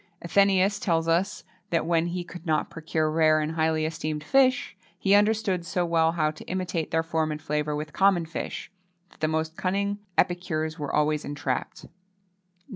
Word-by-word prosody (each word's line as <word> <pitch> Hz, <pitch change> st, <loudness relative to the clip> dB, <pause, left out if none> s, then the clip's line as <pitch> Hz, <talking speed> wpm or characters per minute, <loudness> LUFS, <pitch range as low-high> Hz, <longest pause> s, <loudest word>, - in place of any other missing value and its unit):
Athenæus 195 Hz, +2 st, +3 dB
tells 165 Hz, -2 st, +1 dB
us 175 Hz, +5 st, +1 dB, 0.3 s
that, 165 Hz, -3 st, +1 dB
when 170 Hz, 0 st, +2 dB
he 175 Hz, +1 st, -3 dB
could 175 Hz, 0 st, -10 dB
not 160 Hz, -3 st, 0 dB
procure 160 Hz, -1 st, -1 dB
rare 155 Hz, -1 st, +4 dB
and 155 Hz, 0 st, -1 dB
highly 160 Hz, -1 st, +1 dB
esteemed 155 Hz, -1 st, -3 dB
fish, 255 Hz, -, +2 dB, 0.2 s
he 195 Hz, -, +2 dB
understood 205 Hz, -3 st, +3 dB
so 175 Hz, +1 st, -1 dB
well 165 Hz, -1 st, +2 dB
how 155 Hz, -3 st, +1 dB
to -, -, -12 dB
imitate 180 Hz, -3 st, -2 dB
their 160 Hz, 0 st, +1 dB
form 160 Hz, -1 st, -1 dB
and 150 Hz, -, -4 dB
flavour 150 Hz, -1 st, -2 dB
with 150 Hz, 0 st, -5 dB
common 190 Hz, -4 st, +3 dB
fish, 160 Hz, -, -6 dB, 0.4 s
that -, -, -22 dB
the 155 Hz, -, +1 dB
most 160 Hz, +1 st, -1 dB
cunning 200 Hz, +2 st, -1 dB, 0.2 s
epicures 160 Hz, -3 st, 0 dB
were 145 Hz, -2 st, -3 dB
always 150 Hz, 0 st, +1 dB
entrapped. 140 Hz, -3 st, -4 dB
165 Hz, 170 wpm, -26 LUFS, 155-185 Hz, 0.4 s, rare